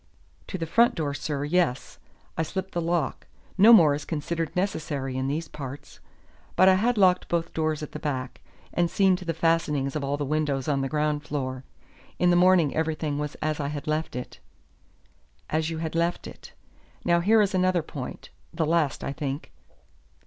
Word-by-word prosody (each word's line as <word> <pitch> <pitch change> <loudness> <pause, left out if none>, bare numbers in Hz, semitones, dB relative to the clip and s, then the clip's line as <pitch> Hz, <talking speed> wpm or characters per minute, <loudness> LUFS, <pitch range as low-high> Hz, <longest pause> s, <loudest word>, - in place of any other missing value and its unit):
"To 190 - -4
the 165 - -3
front 230 +9 +3
door, 145 -3 -2
sir, 145 -1 -3
yes; 155 -4 0 0.4
I - - -1
slipped 190 +4 -4
the 175 - -2
lock. 170 -4 -1 0.3
No 210 +4 +7
more 165 -10 +7
is 145 +1 -4
considered 165 +1 -3
necessary 150 -8 -2
in 130 0 -1
these 155 +4 -2
parts. 140 -1 -9 0.6
But 185 - +5
I 190 - +7
had 230 +5 +1
locked 185 -2 +4
both 170 -1 0
the - - -30
doors 155 -1 -1
at - - -7
the - - -6
back, 130 -4 -4 0.3
and 175 -1 +1
seen 190 0 +3
to 180 - -10
the 165 -2 -2
fastenings 155 -4 +1
of 150 - -2
all 140 +1 -1
the 145 - -2
windows 145 -2 -1
on 140 -2 +1
the 135 - -2
ground 150 0 0
floor. 130 -3 -4 0.5
In 180 0 +3
the - - +4
morning 175 -4 +4
everything 155 -2 -1
was 150 0 -4
as 155 0 -1
I 140 - -1
had 145 0 -5
left 155 -1 -2
it." 125 - -7 1.1
"As 155 +1 0
you 165 - -4
had 160 0 -4
left 170 +1 0
it. - - -11 0.5
Now 170 0 +4
here 215 +6 +4
is 205 -2 +2
another 185 -2 +2
point 140 -4 -8 0.2
the - - -1
last, 160 -3 +1
I 140 - -3
think. 140 0 -5
155 Hz, 190 wpm, -26 LUFS, 145-175 Hz, 1.1 s, No